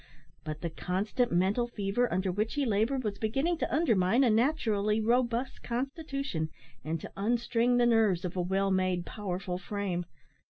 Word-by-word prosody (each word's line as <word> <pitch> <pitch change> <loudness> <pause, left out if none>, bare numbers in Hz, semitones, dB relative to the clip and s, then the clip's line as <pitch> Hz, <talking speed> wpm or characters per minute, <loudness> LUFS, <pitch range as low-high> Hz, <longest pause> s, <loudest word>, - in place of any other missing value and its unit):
But 155 0 -5
the 170 - -3
constant 200 +9 -1
mental 195 +7 +2
fever 230 +2 -1
under 185 0 0
which 215 +7 -1
he 290 -1 +1
laboured 230 +4 +1
was 205 -2 -3
beginning 275 +10 0
to - - -1
undermine 230 - +3
a 240 - +4
naturally 220 -4 +2
robust 240 +2 0
constitution, 270 - -3 0.3
and 160 +3 -2
to - - -8
unstring 235 +3 +1
the 240 - +4
nerves 220 -7 +3
of 180 - -4
a 180 - 0
well 195 +2 +1
made, 185 -2 +1
powerful 185 -3 -4
frame. 185 -3 -3
215 Hz, 160 wpm, -30 LUFS, 185-245 Hz, 0.3 s, a